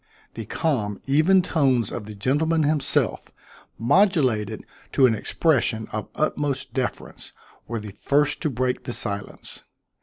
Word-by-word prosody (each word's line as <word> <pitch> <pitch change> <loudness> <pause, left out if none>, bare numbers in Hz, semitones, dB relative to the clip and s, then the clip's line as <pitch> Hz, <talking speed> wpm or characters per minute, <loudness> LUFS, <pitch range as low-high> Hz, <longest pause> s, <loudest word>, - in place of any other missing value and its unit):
The 115 - -6
calm 110 - -1
even 160 +7 +4
tones 135 - +1
of 105 - -5
the 105 0 -9
gentleman 155 +9 +1
himself, 150 -2 0 0.5
modulated 130 - +2 0.3
to 135 - +5
an 120 - +4
expression 115 -1 0
of 110 0 -4
utmost 140 -4 -1
deference, 130 -1 -4 0.3
were 115 0 -3
the 105 -1 -8
first 145 +8 0
to 155 - 0
break 125 -1 -2
the 120 - -4
silence. 100 -3 -4
130 Hz, 130 wpm, -24 LUFS, 110-150 Hz, 0.5 s, to